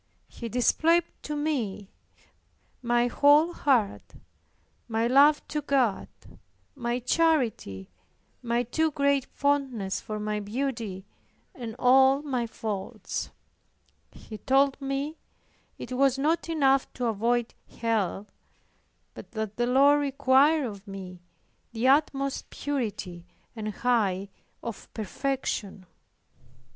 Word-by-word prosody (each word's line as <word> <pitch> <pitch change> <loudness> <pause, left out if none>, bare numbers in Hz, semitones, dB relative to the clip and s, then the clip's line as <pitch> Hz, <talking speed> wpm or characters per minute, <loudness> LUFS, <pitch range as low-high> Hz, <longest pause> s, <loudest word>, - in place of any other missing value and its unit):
He 235 - -8
displayed 325 +8 +3 0.2
to 300 - -5
me 240 -10 -2 0.9
my 240 0 +2
whole 290 +7 +4
heart, 245 -11 0 0.7
my 225 0 0
love 280 +5 +5
to 300 - -2
God, 260 -8 +1 0.7
my 240 -3 -2
charity, 250 - 0 0.5
my 240 0 0
too 315 +7 0
great 280 -2 +1
fondness 265 -9 -1
for 215 -1 -5
my 210 0 -2
beauty 215 -3 -4 0.5
and 230 -3 -7
all 265 +2 +5
my 255 -5 -2
faults; 210 -3 -5 0.8
he 215 -2 -11
told 275 +1 +2
me 275 +3 -3 0.6
it - - -8
was 270 +1 +2
not 320 +4 0
enough 275 -4 +2
to 250 - -3
avoid 235 +2 0 0.2
Hell, 215 -4 -1 0.9
but - - -12
that 220 -2 -4
the 240 0 +1
Lord 280 +3 +5
required 280 +2 +3
of 205 -3 -8
me 185 -2 -8 0.5
the 230 +2 0
utmost 275 -1 +1
purity 210 -11 -4 0.3
and 215 -2 -5
height 205 -4 0 0.3
of 230 -3 -7
perfection. 215 -3 -3
250 Hz, 110 wpm, -27 LUFS, 215-280 Hz, 0.9 s, love